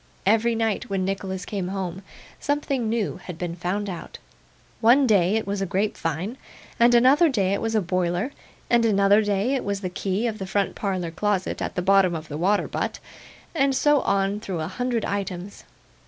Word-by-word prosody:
Every 225 +3 +3
night 225 -2 -1
when 195 -1 -1
Nicholas 190 -1 -3
came 195 -4 -3
home, 190 -1 -4 0.4
something 285 -5 -1
new 225 -2 -1
had 180 -3 -9
been 175 -1 -4
found 185 +4 -2
out. 180 -3 -7 0.6
One 250 +5 +5
day 200 -4 +3
it 220 - 0
was 200 0 -2
a 195 - -1
grapevine, 195 - -2 0.4
and 240 +1 +6
another 275 +8 +6
day 200 -7 +1
it 200 - -1
was 225 0 -1
a 215 - +3
boiler, 180 +5 -1 0.4
and 235 -1 +3
another 200 -1 +4
day 205 +4 0
it 270 - -1
was 200 0 -2
the 185 - -3
key 195 +4 -1
of 220 -2 -2
the 190 - -5
front 200 +1 0
parlour 185 -4 -2
closet 195 +2 -1
at - - -3
the 180 - -1
bottom 195 -2 +4
of 160 0 -7
the 145 - -4
water 200 +4 +2
butt, - - -3 0.6
and 275 -4 +2
so 295 +1 +3
on 195 +1 0
through 190 -6 -4
a 155 - -2
hundred 240 +3 -2
items. 195 -1 -4
200 Hz, 190 wpm, -24 LUFS, 185-225 Hz, 0.6 s, and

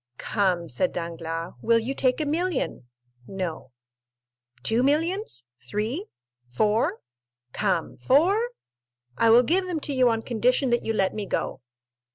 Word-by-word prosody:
"Come," 185 -5 0
said 165 +7 0
Danglars, 165 0 -4
"will 230 0 +4
you 230 +4 -1
take 255 0 +1
a 305 - 0
million?" 315 - -1 0.4
"No." 180 -8 -5 0.9
"Two 225 +2 +1
millions?—three?—four? 215 - -2 0.5
Come, 165 - -1
four? 385 - +3 0.7
I 230 - +3
will 235 +2 +7
give 365 +8 +1
them 345 -3 -2
to 285 - -2
you 255 -2 +4
on 225 -1 0
condition 250 +2 +1
that 240 - +2
you - - -2
let 195 -3 +1
me 210 -2 -4
go." - - -2
225 Hz, 130 wpm, -25 LUFS, 175-285 Hz, 0.9 s, will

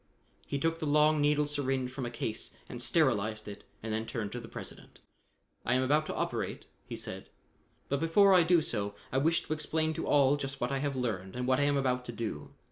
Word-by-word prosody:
He 140 - -1
took 165 +3 0
the 155 - -2
long 150 +1 +4
needled 150 0 +3
syringe 135 -3 -1
from 130 -2 -4
a - - -3
case 115 -2 -4
and 120 - -7
sterilized 110 -8 +1
it 100 -1 -8 0.2
and 110 -1 -3
then 110 +1 -2
turned 105 -4 -3
to 120 - -4
the 115 - -9
President. - - -9 0.7
"I 120 - +2
am 130 - +3
about 150 +4 +2
to - - -3
operate," - - -2 0.2
he - - -5
said, - - -6 0.6
"but 140 - 0
before 190 +5 +5
I 180 - +7
do 170 -1 +4
so, 100 -5 -2 0.2
I 130 - +2
wish 165 +4 +2
to - - -2
explain 155 +1 0
to - - -4
all 140 0 +5
just 135 -1 -4
what 120 +2 -1
I 135 - 0
have 140 0 -1
learned 105 -7 -3
and 125 0 -2
what 130 +1 +3
I 145 - +3
am 145 0 +2
about 125 -2 +1
to 120 - -5
do. 110 -11 -4
135 Hz, 225 wpm, -31 LUFS, 120-150 Hz, 0.7 s, I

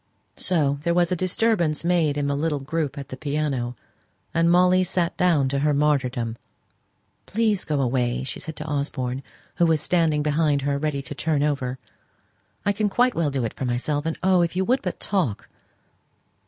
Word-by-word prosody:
So 145 -6 +1
there 170 +2 0
was 175 0 +2
a - - +2
disturbance 180 -4 +1
made 165 -5 +2
in 145 - 0
the 140 0 0
little 150 +1 0
group 145 +1 -3
at 140 -1 -7
the 130 - -6
piano, 140 -5 -2 0.6
and 165 +1 +3
Molly 180 +1 +5
sate 175 -1 0
down 165 -7 +3
to 140 +1 0
her 150 0 +2
martyrdom. 130 -6 0 0.9
"Please, 215 -2 +1
go 150 -2 -1
away!" 125 -1 0
said - - -6
she 160 - -5
to 155 0 -8
Osborne, 140 -3 -2 0.4
who 170 - +4
was 160 -1 +3
standing 160 -3 +1
behind 150 -2 +1
her 140 0 0
ready 145 -2 -2
to 135 - -7
turn 150 0 0
over. 135 -4 -1 0.9
"I 205 - +3
can 205 +1 0
quite 245 +5 +3
well 165 -3 0
do 135 -4 -1
it 115 - -3
for 130 - -4
myself. 145 +5 -1
And 165 - -2
oh! 185 -1 +4
if 170 0 0
you 190 +1 +1
would 255 +5 +2
but 180 - -4
talk!" 180 - -1
150 Hz, 185 wpm, -24 LUFS, 140-175 Hz, 0.9 s, Molly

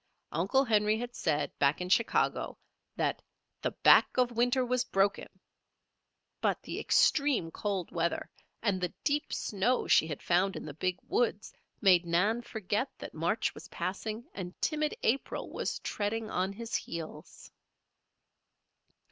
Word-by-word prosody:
Uncle 195 - +2
Henry 215 -2 +3
had 240 +1 -5
said, 150 -3 0
back 140 +1 +3
in 180 - -3
Chicago, 225 +5 +1 0.4
that - - -1 0.4
"the - - 0
back - - +5
of 250 -1 +3
winter 245 +2 +2
was 250 0 +1
broken"; 195 +1 +1 1.1
but - - +1
the - - -5
extreme 280 - +3
cold 195 -3 -3
weather 170 0 -1 0.4
and 200 -4 +1
the 180 - -1
deep 295 0 0
snow 220 +5 0
she 160 - +4
had 150 -3 -6
found 185 +3 +2
in - - -6
the 150 - -6
Big 185 +4 -1
Woods 220 -3 0 0.3
made 185 -3 +6
Nan 180 +7 +1
forget 220 +2 -2
that - - -8
March - - 0
was - - -11
passing 215 +4 -4
and 180 -2 -7
timid 305 -1 0
April 265 +4 -1
was - - -2
treading 215 +1 -3
on 185 +2 0
his 230 +3 -8
heels. 155 -2 -6
205 Hz, 140 wpm, -31 LUFS, 180-240 Hz, 1.1 s, made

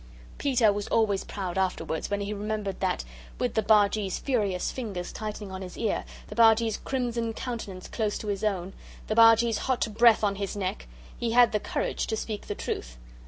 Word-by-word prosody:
Peter 245 -7 +3
was 205 0 -4
always 210 -4 +2
proud 190 -2 -4
afterwards 165 -4 -1
when 205 0 -1
he 200 +1 -3
remembered 210 -2 -3
that, 185 -1 0 0.3
with 245 -2 -1
the 220 - +2
Bargee's 205 -2 +3
furious 205 -9 0
fingers 200 -8 -5
tightening 210 -2 -6
on 190 0 -6
his 180 -1 -8
ear, 220 -3 -1 0.2
the - - -9
Bargee's 225 0 +4
crimson 240 -3 -2
countenance 220 -7 -6
close 215 -3 -1
to - - -7
his 205 0 -2
own, 195 -3 -1 0.3
the 215 - -2
Bargee's 225 0 +6
hot 260 -2 0
breath 230 0 +5
on 200 -1 +1
his 200 0 -3
neck, 185 - -3 0.3
he 230 -1 -2
had 240 -1 +6
the 210 - +1
courage - - -2
to 220 - -1
speak 215 -1 -5
the 205 - -3
truth. - - -5
210 Hz, 185 wpm, -27 LUFS, 195-230 Hz, 0.3 s, Bargee's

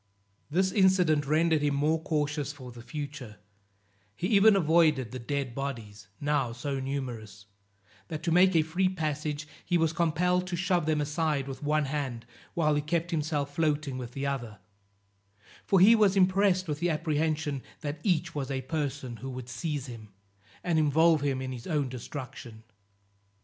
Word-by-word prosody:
This 185 +5 +2
incident 180 -7 +3
rendered 160 +1 +3
him 145 -1 +1
more 155 +3 +1
cautious 150 -2 -1
for 130 -4 -10
the 120 0 -11
future; 140 -5 -7 0.8
he 170 - -4
even 210 0 +6
avoided 155 - +3
the 130 - -5
dead 135 0 -3
bodies, 115 -7 -6
now 145 -5 0
so 135 +3 -3
numerous, 120 -7 -5 0.6
that 155 -2 -6
to 165 - 0
make 180 +2 +5
a 160 - +5
free 180 +4 +1
passage, 155 -3 -3 0.2
he 175 - +1
was 165 -1 +1
compelled 180 +2 +1
to 180 - -2
shove 175 -2 0
them 155 -1 +2
aside 150 -2 -1
with 135 -1 -7
one 150 0 +1
hand, 135 -5 -3 0.3
while 155 -3 +2
he 145 - +1
kept 170 +3 -1
himself 150 -3 -1
floating 150 -4 0
with 125 -1 -7
the 140 0 -3
other; 120 -6 -3 1.1
for 195 - +4
he 205 +6 +8
was 205 -3 +3
impressed 185 0 +3
with 150 -1 -3
the 175 +1 +1
apprehension, 155 -2 -1 0.2
that 145 +1 -4
each 170 -2 0
was 140 -2 -3
a 135 -1 -2
person 135 -3 -3
who 135 - -7
would 125 -1 -7
seize 140 +2 -3
him, 115 -5 -10 0.5
and 170 -3 +2
involve 155 +1 +4
him 135 -2 -1
in 130 - -4
his 120 -2 -7
own 150 -6 0
destruction. 125 -2 -8
150 Hz, 165 wpm, -29 LUFS, 135-165 Hz, 1.1 s, he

